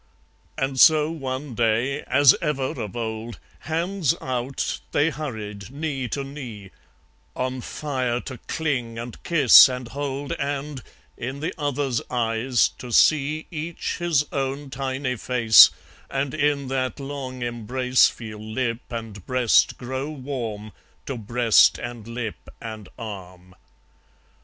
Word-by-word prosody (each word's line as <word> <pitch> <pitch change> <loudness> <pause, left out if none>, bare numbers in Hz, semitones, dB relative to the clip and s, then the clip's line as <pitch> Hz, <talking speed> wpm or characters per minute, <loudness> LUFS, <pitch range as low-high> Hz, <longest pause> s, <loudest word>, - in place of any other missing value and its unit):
And 135 -1 -1
so 155 +1 +6
one 135 -3 -5
day, 120 +5 +1
as 135 0 +6
ever 145 -3 -2
of 105 -1 -6
old, 110 0 -4 0.2
Hands 170 0 0
out, 130 +1 -3
they 150 +3 +3
hurried, 110 -9 -6
knee 140 -2 -3
to 140 +4 -3
knee; 125 -9 -9 0.6
On 130 0 -2
fire 130 -4 -2
to 130 -3 -8
cling 125 -8 -2
and 120 0 -7
kiss 145 -5 +8
and 125 -2 -5
hold 140 +1 -4
And, 140 0 -3 0.4
in 130 +3 -5
the 155 - -3
other's 140 -5 -1
eyes, 120 +1 +1
to 125 - -8
see 155 +4 +3
Each 165 +1 -4
his 165 -4 +2
own 135 0 -3
tiny 130 -1 -2
face, 115 -1 +7 0.4
And 135 0 -2
in 145 -2 +1
that 130 +1 -2
long 135 -3 -5
embrace 125 +2 +2
Feel 110 -2 -9
lip 115 +2 -2
and 110 -4 -6
breast 125 -3 +3
grow 130 +3 -4
warm 125 -7 -5 0.3
To 135 - -4
breast 115 0 +4
and 120 -2 -7
lip 115 -2 -6
and 110 -3 -8
arm. 90 -5 -9
130 Hz, 130 wpm, -24 LUFS, 115-140 Hz, 0.6 s, kiss